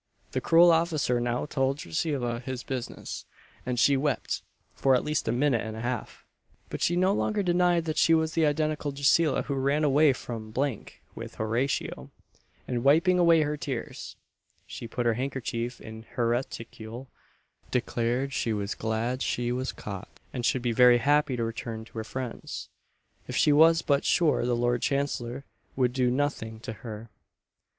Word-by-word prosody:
The - - -1
cruel 170 +1 +6
officer 160 -7 +1
now 120 +2 -1
told 135 -2 0
Drusilla 120 - -2
his 125 0 -5
business, 130 -3 -5 0.4
and 125 -1 -1
she 140 +3 +5
wept 135 -3 -1 0.3
for 135 -1 +3
at 125 - +1
least 150 0 -1
a - - +2
minute 125 -1 +2
and 110 +1 -6
a - - -5
half; 120 -1 -4 0.5
but - - -5
she 175 - +2
no 185 +2 +3
longer 210 0 0
denied 175 -1 +2
that 155 -1 -1
she 165 - +5
was 160 0 0
the 160 -2 +3
identical 150 0 -1
Drusilla 140 +2 +3
who 140 - -3
ran 140 +3 +1
away 145 +1 +5
from 115 -3 -7 0.6
with - - -8
Horatio; 110 - -2 0.6
and 120 -1 -2
wiping 170 +6 +4
away 165 -2 +5
her 150 0 -1
tears, 135 -4 -5 0.5
she 115 - -8
put 120 +2 -3
her 115 - +3
hankerchief 125 -1 -3
in 110 0 -9
her 120 -2 +1
reticule, 120 0 -4 0.6
declared 125 +2 -1
she 115 - 0
was 100 -1 -2
glad 115 +4 -2
she 120 0 -1
was 130 +1 -2
caught, 100 -2 -8
and 125 - -3
should 125 +1 +1
be 120 - +1
very 125 +1 +6
happy 145 +1 +2
to 115 - -1
return 115 0 -5
to 115 - -14
her - - -3
friends, 125 +1 -6 0.6
if - - -5
she 150 - +4
was 165 +2 +6
but 140 -1 +2
"sure 155 -7 +2
the 120 - +2
Lord 120 0 +1
Chancellor 140 -2 -2 0.3
would 125 -2 +1
do 125 -1 +2
nothing 125 -4 -2
to 115 - -5
her." 110 -1 -8
130 Hz, 170 wpm, -27 LUFS, 120-150 Hz, 0.6 s, cruel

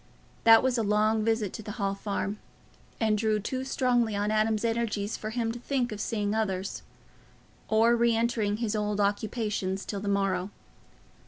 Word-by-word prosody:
That 225 0 +8
was 255 -2 +1
a - - +2
long 215 +1 +2
visit 220 -3 0
to - - -6
the 210 0 -7
Hall 200 -4 -1
Farm, 200 +1 -3 0.6
and 220 -2 +2
drew 215 0 +1
too 260 +5 -3
strongly 245 -4 +1
on 205 +1 0
Adam's 215 +1 +1
energies 225 -2 -1
for 215 - -5
him 225 0 -1
to 240 - -7
think 250 -1 -1
of 210 -1 -5
seeing 210 -2 -1
others, 195 -3 -2 0.9
or 225 +2 +4
re 235 -1 +3
entering 225 -3 0
on - - -2
his 215 0 -1
old 210 -1 -1
occupations 205 -1 -1
till 200 - -4
the 205 - -6
morrow. 195 -2 0
215 Hz, 175 wpm, -28 LUFS, 205-230 Hz, 0.9 s, That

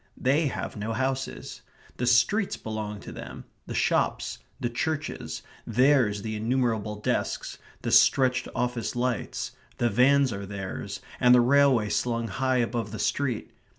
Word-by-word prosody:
They 145 +5 +2
have - - -4
no 110 +1 -3
houses. 130 +2 -3 0.4
The 125 - -1
streets 155 - +3
belong 105 -2 -5
to - - -9
them; - - -9 0.2
the - - -5
shops; - - 0 0.2
the - - -1
churches; 155 +6 -3 0.2
theirs 120 -4 +3
the 110 -1 -3
innumerable 110 -2 0
desks; 105 - -2 0.2
the - - -1
stretched 125 -1 +4
office 125 -2 -2
lights; 120 -2 -2 0.3
the 120 -1 +1
vans 135 +3 +4
are 100 0 -6
theirs, 95 -1 -5 0.2
and 125 0 +6
the 125 - +6
railway 130 -4 +4
slung 115 0 -1
high 130 +5 0
above 115 -3 -1
the 110 - -5
street. 130 -4 -1
120 Hz, 145 wpm, -27 LUFS, 110-130 Hz, 0.4 s, and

